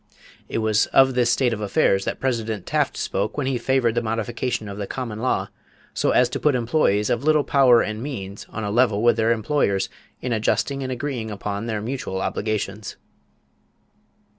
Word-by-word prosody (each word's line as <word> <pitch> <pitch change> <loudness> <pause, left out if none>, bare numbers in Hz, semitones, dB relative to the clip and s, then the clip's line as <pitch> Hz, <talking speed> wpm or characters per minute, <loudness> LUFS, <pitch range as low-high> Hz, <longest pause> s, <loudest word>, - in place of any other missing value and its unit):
It - - -2
was 110 -1 +2
of 135 0 +4
this 125 -1 +2
state 120 0 +2
of 105 - -4
affairs 95 -1 +2
that - - -3
President 115 -6 -2
Taft - - 0
spoke - - -2
when 145 - -1
he 130 -2 0
favored 125 -2 +1
the 120 - 0
modification 115 +1 -2
of 100 0 -7
the 100 - -3
common 115 -5 -5
law 130 +2 0 0.4
"so - - 0
as 125 - +4
to - - -3
put 150 -3 +2
employees 115 -4 +1
of 120 +2 0
little 155 -1 +3
power 130 -5 +5
and 110 +1 -4
means 100 -8 -6
on 110 - -5
a 100 - -2
level 110 -2 +2
with 120 - +5
their 115 0 +2
employers 110 -4 +1 0.3
in 125 -1 -2
adjusting 135 +5 0
and 130 -1 -3
agreeing 125 -3 -3
upon 105 +1 -4
their 110 -2 -2
mutual 120 -6 -4
obligations." 105 +1 -3
115 Hz, 185 wpm, -23 LUFS, 105-130 Hz, 0.4 s, power